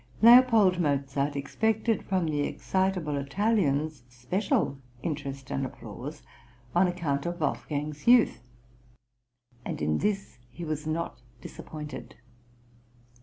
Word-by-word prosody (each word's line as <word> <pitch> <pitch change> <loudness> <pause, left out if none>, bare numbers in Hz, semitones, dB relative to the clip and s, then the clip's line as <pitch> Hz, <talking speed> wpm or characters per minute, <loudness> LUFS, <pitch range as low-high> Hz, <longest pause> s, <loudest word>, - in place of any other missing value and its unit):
L. 240 +2 +10 0.4
Mozart 140 -1 0
expected 220 +10 0
from 185 -3 0
the 150 -2 -1
excitable 180 0 0
Italians 155 - 0
special 135 - -1 0.2
interest 140 -4 -4
and 135 - -1
applause 130 +3 -7 0.5
on 180 +2 +4
account 165 -5 -1
of 175 0 -4
Wolfgang's 150 0 -3
youth; 240 -1 +6 1.2
and - - -4
in 75 0 +1
this 195 - -2
he 170 +8 -8
was 155 -1 -3
not 155 -6 -3 0.2
disappointed. 150 +3 -8
150 Hz, 105 wpm, -28 LUFS, 140-185 Hz, 1.2 s, L